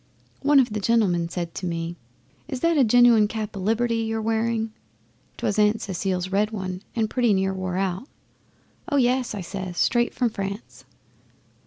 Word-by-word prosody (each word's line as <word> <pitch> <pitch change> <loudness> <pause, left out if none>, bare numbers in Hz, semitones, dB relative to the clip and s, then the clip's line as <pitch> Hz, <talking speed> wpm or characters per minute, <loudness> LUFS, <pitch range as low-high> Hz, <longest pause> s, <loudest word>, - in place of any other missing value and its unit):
One 290 0 +5
of 245 -5 +2
the 210 - -1
gentlemen 195 -6 +2
said 170 -1 -4
to 185 - -4
me, 170 0 -3 0.5
"Is 265 -5 -5
that 335 0 +3
a 285 - +5
genuine 235 -2 +5
cap 215 -1 -5
o' - - -5
Liberty 230 +4 +1
you're 225 0 -1
wearing?" 225 0 -1 0.6
'Twas 205 - -1
Aunt 210 +1 +3
Cecile's 185 -1 -2
red 205 +2 +2
one, 190 -4 -5
and 225 -2 +1
pretty 235 -2 +2
near 190 0 0
wore 185 -1 -3
out. 190 +5 -2 0.8
"Oh 285 - +1
yes!" 250 -2 +1
I 200 - -4
says, 185 0 -6
"straight 240 0 +2
from 245 -3 +1
France." 200 +1 -6
215 Hz, 170 wpm, -24 LUFS, 190-235 Hz, 0.8 s, One